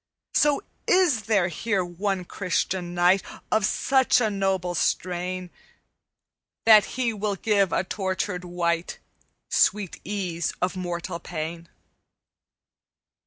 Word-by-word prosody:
"'So 295 -1 +3 0.2
is 300 - +3
there 200 -5 +3
here 195 +2 -1
one 185 +1 -2
Christian 180 -1 -2
knight 180 +2 +4 0.3
Of 215 -1 +3
such 265 +2 +3
a 220 -3 +1
noble 190 -3 0
strain 180 +1 -1 1.1
That 215 -3 +8
he 240 -3 +1
will 210 -1 -2
give 200 -2 +2
a - - +1
tortured 190 -1 -3
wight 170 -1 -1 0.5
Sweet 205 -4 +1
ease 180 -5 -2
of 180 0 -1
mortal 175 -1 -4
pain?' 165 0 -6
185 Hz, 110 wpm, -25 LUFS, 175-210 Hz, 1.1 s, That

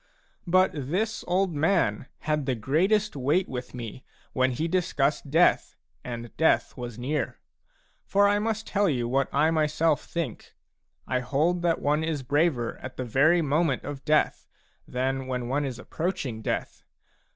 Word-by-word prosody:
But 185 +2 +4
this 180 - -2
old 185 0 +1
man 145 - +1
had 150 -3 -1
the 130 - +1
greatest 185 - +1
weight 145 +8 +1
with 125 -1 -6
me 120 +1 -7 0.3
when 130 0 +2
he 140 +6 -2
discussed 150 -5 0
death 165 +5 +3 0.3
and 120 -1 -7
death 160 - +2
was 120 -3 -6
near. 140 +4 -2 0.7
For 200 +1 +4
I 205 0 +3
must 220 0 -2
tell 200 -2 +1
you 120 -5 0
what 135 +3 +1
I 155 +3 +3
myself 155 -1 +1
think: 165 -9 -5 0.5
I 130 - 0
hold 150 +8 0
that 170 -1 0
one 150 +2 +2
is 160 -4 -2
braver 140 -3 +1
at 130 - -8
the 130 - -3
very 155 +9 +4
moment 150 -1 +1
of 145 -1 -6
death 155 0 +1 0.4
than 130 +1 -2
when 125 -2 -3
one 140 +3 0
is 130 -4 -4
approaching 140 - -3
death. - - -3
145 Hz, 155 wpm, -27 LUFS, 130-170 Hz, 0.7 s, But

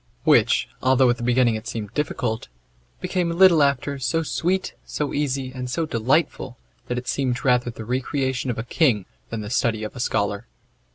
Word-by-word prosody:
Which, - - +4
although 130 -1 +4
at 120 - -2
the - - -9
beginning 125 -1 +3
it 110 +1 -5
seemed 110 -3 -5
difficult, 125 -6 -2 0.5
became 175 -2 -1
a - - -3
little 175 -3 +6
after 140 0 +1
so 165 +5 0
sweet, 185 +4 -1
so 150 -1 -3
easy, 135 -3 -1
and 125 -1 -5
so 165 +5 -1
delightful, 130 0 0 0.3
that 125 - -2
it 125 - -5
seemed 130 -2 -1
rather 125 -1 +3
the 110 -1 -8
recreation 130 +1 -1
of 120 - -2
a 115 - -2
king 120 - +2 0.2
than 110 - -4
the 105 +1 -6
study 110 -3 +1
of 105 - -6
a - - -7
scholar. 100 -1 -1
125 Hz, 185 wpm, -23 LUFS, 115-145 Hz, 0.5 s, little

